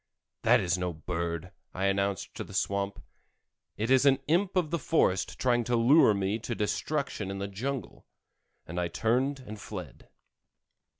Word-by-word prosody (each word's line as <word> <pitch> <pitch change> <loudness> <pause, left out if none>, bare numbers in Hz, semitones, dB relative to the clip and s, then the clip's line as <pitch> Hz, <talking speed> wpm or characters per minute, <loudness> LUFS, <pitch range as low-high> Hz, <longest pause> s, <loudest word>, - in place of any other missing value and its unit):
"That - - +5
is 90 0 0
no 90 -1 -2
bird," 85 +1 -4 0.2
I 95 - -1
announced 100 0 0
to - - -5
the - - -10
swamp; 100 0 -1 0.8
"it 110 +4 -1
is 130 0 +6
an 135 -1 +5
imp 180 +6 +2
of 175 -4 +1
the 170 - 0
forest 95 - +1
trying 120 -2 +2
to 120 - +1
lure 115 -1 +6
me 100 +3 -1
to 120 +1 -4
destruction 110 0 -2
in 100 - -4
the 100 0 -3
jungle," 115 +2 -5 0.6
and 85 +2 -4
I 90 - 0
turned 130 +9 0
and 110 -4 -9
fled. 90 -9 -8
105 Hz, 165 wpm, -29 LUFS, 95-130 Hz, 0.8 s, is